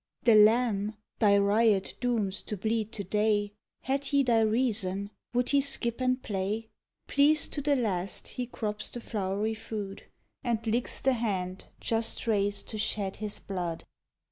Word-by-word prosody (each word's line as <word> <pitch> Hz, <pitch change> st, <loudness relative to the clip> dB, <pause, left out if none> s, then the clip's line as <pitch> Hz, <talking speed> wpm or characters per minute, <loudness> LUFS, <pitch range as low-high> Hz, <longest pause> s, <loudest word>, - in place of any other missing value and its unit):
The 235 Hz, -, +6 dB
lamb, 215 Hz, -1 st, +4 dB, 0.2 s
thy 200 Hz, -2 st, +5 dB
riot 200 Hz, 0 st, +3 dB
dooms 220 Hz, -6 st, 0 dB
to 210 Hz, -, -3 dB
bleed 220 Hz, +2 st, -1 dB
to 205 Hz, -, -3 dB
day, 205 Hz, +1 st, +1 dB, 0.3 s
Had 275 Hz, +2 st, -1 dB
he 280 Hz, 0 st, +3 dB
thy 235 Hz, -3 st, +3 dB
reason, 215 Hz, -4 st, +1 dB, 0.2 s
would 245 Hz, 0 st, +1 dB
he 280 Hz, -1 st, +4 dB
skip 245 Hz, -3 st, -1 dB
and 255 Hz, 0 st, +2 dB
play? 210 Hz, +3 st, -2 dB, 0.4 s
Pleased 295 Hz, +2 st, +3 dB
to 290 Hz, -, -1 dB
the 285 Hz, 0 st, +2 dB
last 195 Hz, -7 st, -1 dB
he 250 Hz, -1 st, -4 dB
crops 210 Hz, -3 st, -3 dB
the 240 Hz, -, -6 dB
flowery 210 Hz, -1 st, -2 dB
food, 210 Hz, -2 st, -6 dB, 0.4 s
And 230 Hz, -2 st, -1 dB
licks 230 Hz, +2 st, 0 dB
the 265 Hz, -, +3 dB
hand 190 Hz, -6 st, -2 dB
just 225 Hz, +1 st, -1 dB
rais'd 205 Hz, -2 st, 0 dB
to 215 Hz, -, -5 dB
shed 200 Hz, -2 st, -2 dB
his 210 Hz, -1 st, -4 dB
blood. 175 Hz, -4 st, -4 dB
220 Hz, 155 wpm, -29 LUFS, 200-240 Hz, 0.4 s, The